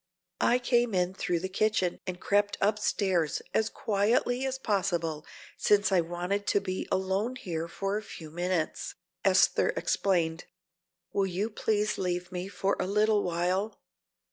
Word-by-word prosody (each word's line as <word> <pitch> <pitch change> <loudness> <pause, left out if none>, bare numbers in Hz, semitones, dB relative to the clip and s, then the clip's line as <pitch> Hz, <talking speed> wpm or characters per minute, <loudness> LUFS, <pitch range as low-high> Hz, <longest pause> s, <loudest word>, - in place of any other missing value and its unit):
"I 245 - +4
came 240 -3 +1
in 180 0 +1
through 175 -3 -1
the 190 - -2
kitchen 190 -2 +1
and 180 -1 -4
crept 205 +1 +1
upstairs 195 -5 +1
as 220 0 +2
quietly 230 +5 +1
as 265 0 -2
possible, 175 -9 -1 0.3
since 205 -1 +3
I 185 -2 +4
wanted 180 +4 -3
to - - +3
be 190 -1 -4
alone 190 +6 0
here 170 -8 -4
for 195 +3 -2
a - - -3
few 160 -7 -10
minutes," 175 -1 -2 0.3
Esther 190 -1 +4
explained. 170 -4 0 0.7
"Will 195 -1 +2
you 195 +5 -2
please 210 0 0
leave 180 -1 -2
me 180 +1 -4
for 195 0 0
a - - 0
little 210 +1 +3
while?" 180 +4 -1
195 Hz, 145 wpm, -29 LUFS, 180-210 Hz, 0.7 s, I